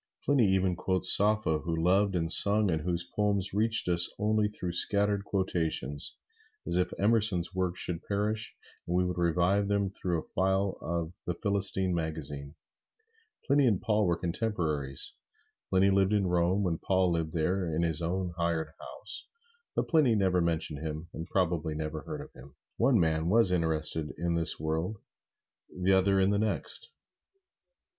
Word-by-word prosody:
Pliny 135 -7 +3
even 95 -1 +1
quotes 95 +1 +5
Sappho, 105 -6 +2
who 85 +2 -3
loved 95 +4 +2
and 80 -1 -1
sung, 105 0 +6
and 80 -1 -1
whose 85 0 -2
poems 100 -2 0
reached 110 +1 +2
us 85 -1 +2
only 105 0 +1
through 90 -4 -5
scattered 100 +3 +1
quotations, 80 -8 -2 0.5
as 85 - -1
if 90 - 0
Emerson's 100 -4 +1
works 95 -1 -2
should 85 -1 -3
perish 105 +2 -2 0.3
and 85 - -1
we 90 0 +2
would 90 -1 -3
revive 90 +4 +1
him 100 -1 0
through 90 -3 -2
a - - -11
file 95 +1 0
of 85 0 -3
"The 90 - -1
Philistine" 100 -2 0
magazine. 75 -3 -4 0.9
Pliny 140 -1 +3
and 105 -6 +2
Paul 105 -2 +1
were 85 -1 +1
contemporaries. 85 - -3 0.6
Pliny 95 +1 +3
lived 95 +1 +2
at 100 - +2
Rome 90 +2 +1
when 85 -4 -1
Paul 95 -2 +1
lived 80 -2 -2
there 90 +2 -1
in 85 - 0
his 80 -1 0
own 90 +1 -2
hired 85 -2 -1
house, - - -6 0.5
but - - -1
Pliny 150 -9 +3
never 95 -3 +2
mentioned 80 -3 -1
him, 80 +2 -6
and 80 +2 -6
probably 85 -5 -1
never 75 0 -4
heard - - -7
of - - -12
him. 65 +2 -15 0.2
One 120 -1 +3
man 80 0 +1
was 110 -2 +4
interested 80 -2 -1
in 85 0 -1
this 85 -1 +1
world, 80 +7 -2 0.7
the 90 +1 0
other 95 +1 +3
in 95 +1 +3
the 100 - +1
next. 110 - -1
90 Hz, 165 wpm, -29 LUFS, 80-100 Hz, 0.9 s, sung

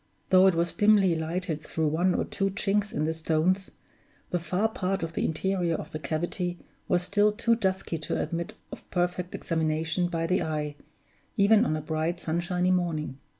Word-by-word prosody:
Though 185 0 +7
it 190 - +4
was 170 0 0
dimly 205 -1 +4
lighted 160 0 -2
through 160 -1 -1
one 175 +4 +2
or - - 0
two 195 0 -1
chinks 200 +1 0
in 150 - -1
the 160 - 0
stones, 165 +4 +1 0.6
the 175 - +1
far 180 +6 0
part 195 -3 -2
of 165 0 -4
the - - -1
interior 175 +1 0
of - - -6
the 155 - -4
cavity 175 +4 -2 0.3
was 180 -1 +2
still 205 +3 +3
too 230 +2 +1
dusky 190 -6 -1
to 155 - -2
admit 170 +6 -3 0.2
of - - -10
perfect 180 0 -1
examination 160 +1 0
by 165 -1 -2
the 180 +3 +1
eye, 150 -2 -2 0.6
even 210 +2 +5
on 155 - 0
a - - -4
bright 160 +3 -2
sunshiny 180 +2 0
morning. 165 -6 -1
175 Hz, 180 wpm, -27 LUFS, 160-190 Hz, 0.6 s, Though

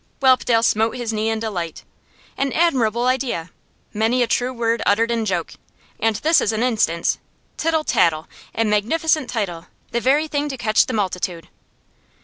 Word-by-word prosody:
Whelpdale 255 -3 +3
smote 225 +1 +2
his 235 -2 -3
knee 215 +1 0
in 225 0 -1
delight. 185 -7 -4 0.5
'An 275 0 -1
admirable 245 -9 +2
idea! 245 -10 -1 0.4
Many 225 +4 +2
a - - -1
true 250 +2 0
word 230 -2 -1
uttered 225 +3 +2
in 230 -1 0
joke, 180 -5 -2 0.5
and 225 -1 +1
this 315 +9 +3
is 215 - +1
an 220 +1 -1
instance! 215 -9 +1 0.4
Tittle 320 -1 0
Tattle 160 - +1 0.3
a 225 - +1
magnificent 260 +8 +1
title; 180 -8 -3 0.2
the 235 - -1
very 290 +5 +2
thing 295 -1 -2
to 270 - -5
catch 220 -2 +2
the 255 - -3
multitude. 180 -5 -3
230 Hz, 160 wpm, -21 LUFS, 210-255 Hz, 0.5 s, Whelpdale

